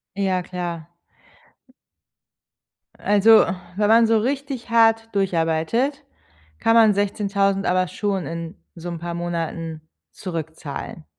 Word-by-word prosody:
Ja 190 -2 0
klar. 175 -3 -5 2.1
Also, 210 +2 +5 0.3
wenn 205 0 +2
man 230 +1 +6
so 225 0 +3
richtig 265 0 -3
hart 225 -1 +4
durcharbeitet, 190 - 0 0.5
kann 225 - +2
man 220 -2 +6
16000 200 -1 0
aber 185 0 +2
schon 195 0 -2
in 165 +2 -6 0.2
so 170 0 -8
'n 170 - -5
paar 170 +1 -5
Monaten 165 -2 -4 0.3
zurückzahlen. 160 -3 -6
195 Hz, 105 wpm, -22 LUFS, 170-225 Hz, 2.1 s, man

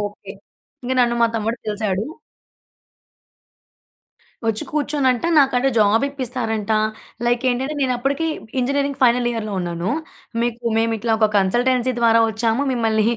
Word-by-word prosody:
Okay. 205 -1 -6 0.5
ఇంక 255 - -1
నన్ను 235 0 +1
మా - - +6
తమ్ముడు 225 +2 -1
కలిసాడు. 210 -1 -1 2.4
వచ్చి 220 -1 -1
కూర్చొనంట 285 -4 0
నాకంట 270 -2 +3
జాబ్ 215 +5 +4
ఇప్పిస్తారంటా. 230 -5 -2 0.5
లైక్ 240 +1 +1
ఏంటంటే 265 +5 -2
నేనప్పటికీ 270 +4 0 0.3
ఇంజనీరింగ్ 280 +2 -1
ఫైనల్ 245 0 +4
ఇయర్‍‌లో 220 -3 -4
ఉన్నాను. 170 0 -3 0.5
మీకు 240 0 -3
మేము 225 0 +1
ఇట్లా 230 +1 -1
ఒక 215 -1 +4
కన్సల్టెన్సీ 245 +6 +1
ద్వారా 230 -1 +5
వచ్చాము. 225 +4 0
మిమ్మల్ని 220 -2 +1
235 Hz, 120 wpm, -21 LUFS, 220-255 Hz, 2.4 s, మా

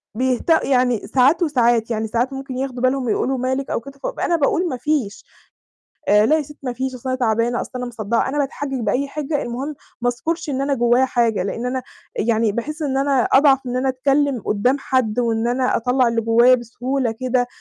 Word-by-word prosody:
بيهت 255 +5 -1
يعني 250 -4 +1
ساعات 270 +7 +3
وساعات، 240 -6 +2
يعني 220 0 -1
ساعات 240 +4 -1
ممكن 270 -1 -6
ياخدوا 260 -2 -4
بالهُم 255 0 +1
ويقولوا: 260 +3 0
"مالِك؟" 260 +2 -2
أو - - -1
كده، 275 +3 -13
فابقى - - -2
أنا 345 - +2
باقول 335 +4 +1
ما 255 - -3
فيش. 255 -6 -2 0.8
آآ، 210 +1 +5
"لا 310 +6 +4
يا - - 0
ستي 295 +1 -12
ما 250 - -3
فيش، 260 +2 -3
أصل 255 +1 -6
أنا 255 - -1
تعبانة، 235 0 +1
أصل - - -7
أنا 250 0 -3
مصدّعة."، 230 0 -1
أنا 285 - -3
باتحجّج 275 -1 -3
بأي 265 +5 0
حِجة، 290 +1 -3
المهم 260 +5 -4 0.3
ما 245 - +2
أذكرش 320 +6 -3
إن 270 -1 -1
أنا 280 +1 0
جوّايا 240 0 +3
حاجة، 235 -6 +1
لأن 230 +5 -4
أنا 255 +1 -2 0.3
يعني 225 0 +1
باحس 300 +9 -4
إن 270 -3 -1
أنا 275 -2 +2
أضعف 270 -1 +6
من 250 - -4
إن 250 - -1
أنا 265 +1 0
أتكلّم 275 0 +1
قدّام 245 +7 +1
حد، 255 -5 0
وإن 230 -1 0
أنا 255 +1 +1
أطلّع 250 +2 +2
اللي 230 0 0
جوّايا 235 +3 +5
بسهولة 245 +1 -2
كده. 250 +1 -1
255 Hz, 210 wpm, -20 LUFS, 235-275 Hz, 0.8 s, أضعف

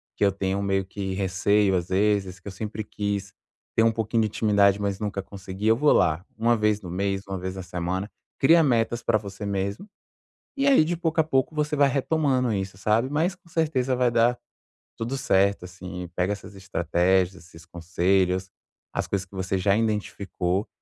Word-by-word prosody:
que - - -1
eu 100 - +4
tenho 95 0 -2
meio 95 -1 0
que 95 0 -5
receio 100 +1 +2
às 90 -1 -1
vezes, 95 -1 +1
que 95 - -14
eu 100 - -4
sempre 110 +2 -5
quis 100 -1 -3 0.4
ter 115 - +4
um 115 - +4
pouquinho 115 +1 0
de - - +1
intimidade, 100 -2 +3
mas 100 -1 -2
nunca 105 -2 -3
consegui, 95 +1 -6
eu 110 - +6
vou 150 +2 +4
lá," 80 +3 +2
uma 115 +1 +3
vez 105 0 +1
no 90 - -8
mês, 100 +1 -1
uma 95 -1 -3
vez 95 +1 -5
na 95 - -6
semana, 90 +3 -3 0.3
cria 165 +4 +6
metas 120 -3 +1
pra 110 - +3
você 100 -1 -7
mesmo. 100 - -3 0.7
E 275 +1 +2
aí 270 - +6
de 175 +1 -2
pouco 165 -1 -1
a - - 0
pouco 135 +1 0
você 150 0 0
vai 140 -1 +4
retomando 135 -3 +1
isso, 95 -1 -3
sabe, 110 +6 +1
mas 165 +5 0
com 175 - -25
certeza 140 -6 0
vai 125 -1 +2
dar 120 +1 +3 0.6
tudo 115 +4 -3
certo 100 -6 +2
assim, 90 -1 -8
pega 90 +3 +1
essas 100 0 -10
estratégias, 95 0 +1
esses 85 -1 -15
conselhos, 90 +2 0 0.4
as - - -1
coisas 95 -1 -2
que 95 - -16
você 95 0 -1
já 100 +2 +2
identificou 100 -3 -1
100 Hz, 190 wpm, -25 LUFS, 95-115 Hz, 0.7 s, eu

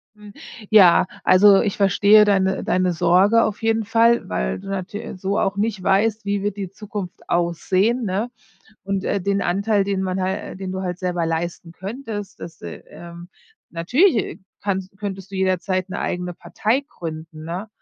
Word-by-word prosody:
Hm. 210 -1 -14 0.4
Ja. 190 -6 +7 0.2
Also, 195 +1 +6
ich 200 - -2
verstehe 205 +2 +5
deine 190 -2 +1
deine 185 0 +1
Sorge 185 +7 +4
auf 215 +1 -2
jeden 225 -1 +1
Fall, 230 +2 +3
weil 60 - -2
du 195 0 -10
natü 195 +1 -5
so 195 +3 -1
auch 195 - 0
nicht 205 -2 -1
weißt, 210 +3 +1
wie 200 0 -1
wird 205 0 -2
die 195 -3 -4
Zukunft 195 -2 -8
aussehen, 185 +7 +1
ne 205 +6 -1 0.6
und, 195 -1 -2
äh, 200 - 0
den 200 +1 0
Anteil, 200 +3 +1
den 195 -1 -1
man 185 0 -2
hal 185 0 -3
den 190 -1 -5
du 190 - -4
halt 180 -1 -4
selber 175 -2 -1
leisten 165 +1 -3
könntest, 205 0 -7
das 165 -2 -10
äh, 85 -1 -8
ähm, 170 0 -11 0.4
natürlich, 245 - +2
äh, 210 - -2 0.2
kannst 195 -1 -3
könntest 195 -1 -6
du - - -6
jederzeit 185 0 0
'ne 195 - -5
eigene 180 0 -3
Partei 235 +9 -1
gründen, 160 -1 -8
ne, 180 +6 -5
195 Hz, 170 wpm, -21 LUFS, 180-205 Hz, 0.6 s, Ja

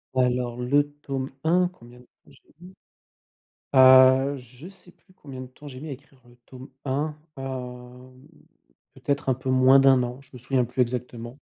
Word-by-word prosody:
Alors, 125 -1 0
le 145 +4 +1
tome 135 -2 -4
1 175 +3 +2
combien 120 -6 -17
de - - -17
temps - - -27
j'ai - - -24
mis? 180 +2 -14 1.0
Heu, 130 +1 +6
je 125 +5 -13
sais 185 -2 -17
plus 185 - -28
combien 135 -7 -10
de - - -7
temps 145 +4 -15
j'ai 130 -2 -9
mis 155 +3 -8
à - - -5
écrire 135 0 -13
le 120 - -20
tome 130 0 -12 0.2
1, 145 +3 -2 0.2
hem, 130 0 -9 0.7
peut-être 140 -1 -2
un 130 - +2
peu 130 +1 -6
moins 130 +1 +6
d'1 135 -1 +5
an, 125 +1 -6
je 135 - -21
me 125 - -10
souviens 125 +1 0
plus 125 +2 -2
exactement. 120 0 -4
130 Hz, 180 wpm, -24 LUFS, 125-140 Hz, 1.0 s, Heu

